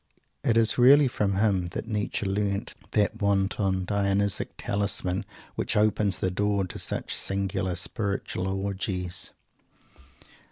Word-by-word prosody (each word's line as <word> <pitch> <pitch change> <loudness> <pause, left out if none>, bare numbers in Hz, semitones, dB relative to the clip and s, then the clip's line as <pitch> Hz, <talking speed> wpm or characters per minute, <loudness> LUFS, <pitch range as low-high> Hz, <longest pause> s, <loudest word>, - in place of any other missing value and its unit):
It 115 - +2
is 115 +1 +4
really 140 +3 +7
from 105 -5 0
him 95 -3 +2
that - - -4
Nietzsche 105 -1 -2
learnt 100 +1 -1 0.2
that 105 +1 +1
wanton 95 -1 +1
Dionysic 100 0 +1
talisman 100 -1 -1 0.3
which - - -1
opens 105 -2 +2
the 95 - -1
door 100 +1 +1
to 90 - -7
such - - -3
singular 95 -1 -1
spiritual 100 0 -2
orgies. 95 -2 -1
100 Hz, 120 wpm, -27 LUFS, 95-105 Hz, 0.3 s, really